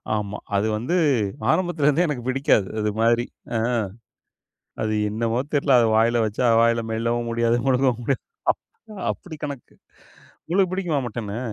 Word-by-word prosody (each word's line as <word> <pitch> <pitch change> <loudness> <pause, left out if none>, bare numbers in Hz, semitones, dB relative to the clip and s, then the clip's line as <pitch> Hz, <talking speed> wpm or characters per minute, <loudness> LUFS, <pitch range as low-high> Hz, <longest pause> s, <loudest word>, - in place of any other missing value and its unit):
ஆமா. 105 -1 -3 0.2
அது 100 +2 +2
வந்து 125 +11 -1 0.6
ஆரம்பத்துலருந்தே 175 -2 +2
எனக்குப் 130 -4 -4
பிடிக்காது, 130 -7 +2
அது 105 0 0
மாதிரி. 115 +1 +3 0.3
அ. - - +1 1.2
அது 110 0 0 0.2
என்னவோ 115 +2 -1
தெர்ல. 140 -1 +2
அத 115 - +4
வாயில 115 +1 +3
வச்சா, 110 +4 -1
வாயில 115 0 +3
மெல்லவும் 115 +1 -1
முடியாது, 115 0 +2
முழுங்கவும் 125 -2 +2
முடியாது. 135 +1 -1 0.3
அப் - - -23 0.5
அப்படி 160 -4 -10
கணக்கு. 140 -4 -7 0.7
உங்களுக்கு 185 +1 +2
புடிக்குமா 175 -7 0
மட்டன்னு? 110 -2 -5
120 Hz, 135 wpm, -23 LUFS, 115-140 Hz, 1.2 s, அத